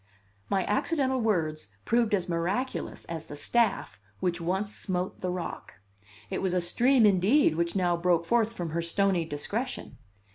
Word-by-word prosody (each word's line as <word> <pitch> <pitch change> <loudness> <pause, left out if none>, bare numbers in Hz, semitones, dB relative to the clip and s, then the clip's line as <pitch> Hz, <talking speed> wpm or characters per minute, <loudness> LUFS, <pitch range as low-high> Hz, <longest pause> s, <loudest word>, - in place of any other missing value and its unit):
My 190 -2 +1
accidental 260 +3 +1
words 155 - -1
proved 230 -2 +2
as 185 -3 -3
miraculous 185 +10 -2
as 165 -1 -6
the 145 - -8
staff 230 +7 0 0.2
which 175 -2 -1
once 190 +5 -1
smote 180 -1 -3
the 185 - -1
rock. 180 -1 -5 0.6
It - - -2
was 185 -1 0
a - - +3
stream, 240 +8 +4
indeed, 205 - +4
which 170 +2 -1
now 175 -2 +2
broke 170 -1 +1
forth 230 +3 +2
from 170 -5 -4
her 170 +2 -1
stony 180 0 +1
discretion. 180 - -4
185 Hz, 155 wpm, -28 LUFS, 170-220 Hz, 0.6 s, stream